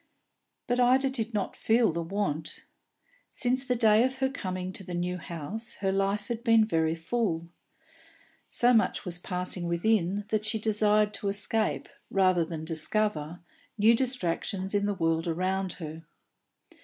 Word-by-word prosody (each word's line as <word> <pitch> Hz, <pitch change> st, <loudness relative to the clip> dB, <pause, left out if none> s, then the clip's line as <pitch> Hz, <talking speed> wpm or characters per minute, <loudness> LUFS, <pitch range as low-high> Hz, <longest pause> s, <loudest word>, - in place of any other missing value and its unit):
But 245 Hz, 0 st, 0 dB
Ida 260 Hz, +2 st, +4 dB
did 235 Hz, -3 st, -3 dB
not 205 Hz, -4 st, -2 dB
feel 225 Hz, -1 st, +3 dB
the 170 Hz, +1 st, -3 dB
want. 165 Hz, -4 st, -3 dB, 0.6 s
Since 255 Hz, +1 st, 0 dB
the 250 Hz, -2 st, 0 dB
day 220 Hz, -1 st, +5 dB
of 260 Hz, +1 st, 0 dB
her 265 Hz, 0 st, +1 dB
coming 185 Hz, -7 st, -4 dB
to 195 Hz, -, -8 dB
the 180 Hz, -1 st, -6 dB
new 180 Hz, +1 st, -2 dB
house 175 Hz, +8 st, -4 dB
her 195 Hz, -1 st, -1 dB
life 195 Hz, +1 st, 0 dB
had 235 Hz, -1 st, -4 dB
been 225 Hz, -3 st, +5 dB
very 160 Hz, -5 st, +1 dB
full; 170 Hz, -2 st, -2 dB, 1.0 s
so 245 Hz, +1 st, +3 dB
much 225 Hz, -2 st, +2 dB
was 175 Hz, -1 st, -2 dB
passing 180 Hz, -1 st, -3 dB
within, 195 Hz, +2 st, +1 dB
that 215 Hz, -1 st, 0 dB
she 215 Hz, +1 st, 0 dB
desired 210 Hz, -1 st, +2 dB
to 200 Hz, -, -4 dB
escape, 205 Hz, +2 st, 0 dB, 0.2 s
rather 185 Hz, -3 st, +3 dB
than 160 Hz, -1 st, -6 dB
discover, 165 Hz, 0 st, -1 dB, 0.4 s
new 220 Hz, +2 st, +6 dB
distractions 195 Hz, -6 st, -1 dB
in 205 Hz, 0 st, +1 dB
the 205 Hz, -, -1 dB
world 165 Hz, -1 st, 0 dB
around 185 Hz, +3 st, -1 dB
her. 160 Hz, -1 st, -8 dB
200 Hz, 155 wpm, -28 LUFS, 175-225 Hz, 1.0 s, new